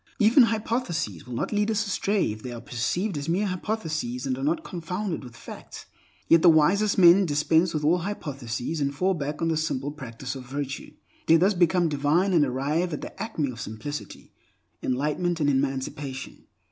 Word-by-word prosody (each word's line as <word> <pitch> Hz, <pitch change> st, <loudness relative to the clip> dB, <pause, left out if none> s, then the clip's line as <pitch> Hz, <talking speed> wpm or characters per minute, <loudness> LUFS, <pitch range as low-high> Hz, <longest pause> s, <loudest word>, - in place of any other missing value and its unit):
Even 235 Hz, +2 st, +6 dB
hypotheses 215 Hz, -, -2 dB
will 125 Hz, -, -6 dB
not -, -, -2 dB
lead 210 Hz, 0 st, +1 dB
us 220 Hz, 0 st, +1 dB
astray 200 Hz, -, 0 dB
if 110 Hz, 0 st, -8 dB
they 125 Hz, -, -6 dB
are 120 Hz, -, -6 dB
perceived 145 Hz, -, -2 dB
as 145 Hz, +3 st, -5 dB
mere 190 Hz, +5 st, +1 dB
hypotheses 160 Hz, -, -3 dB
and 130 Hz, -1 st, 0 dB
are 135 Hz, -, -6 dB
not 155 Hz, +4 st, 0 dB
confounded 180 Hz, +1 st, -4 dB
with 120 Hz, -2 st, -11 dB
facts. -, -, -10 dB, 0.4 s
Yet 165 Hz, -1 st, +6 dB
the 175 Hz, -, +7 dB
wisest 190 Hz, +7 st, +4 dB
men 185 Hz, +1 st, +7 dB
dispense 160 Hz, +3 st, +2 dB
with 155 Hz, -2 st, -2 dB
all 170 Hz, +4 st, +4 dB
hypotheses, 145 Hz, -, -4 dB
and 140 Hz, 0 st, -1 dB
fall 185 Hz, +6 st, +2 dB
back 150 Hz, -1 st, -4 dB
on 165 Hz, -, +2 dB
the 160 Hz, -, +1 dB
simple 145 Hz, -3 st, -2 dB
practice 130 Hz, -2 st, -7 dB
of 135 Hz, -2 st, -7 dB
virtue. 140 Hz, 0 st, -5 dB, 0.3 s
They 165 Hz, -, +7 dB
thus 190 Hz, +5 st, +3 dB
become 175 Hz, -1 st, +3 dB
divine, 155 Hz, +6 st, +1 dB
and 165 Hz, -4 st, +5 dB
arrive 145 Hz, +6 st, -1 dB
at 150 Hz, -, -4 dB
the -, -, -8 dB
acme 160 Hz, -, -2 dB
of 115 Hz, -2 st, -8 dB
simplicity, 110 Hz, +9 st, -7 dB, 0.5 s
enlightenment, 150 Hz, +7 st, -1 dB
and 145 Hz, -2 st, +3 dB
emancipation. 135 Hz, 0 st, -3 dB
155 Hz, 185 wpm, -26 LUFS, 135-185 Hz, 0.5 s, the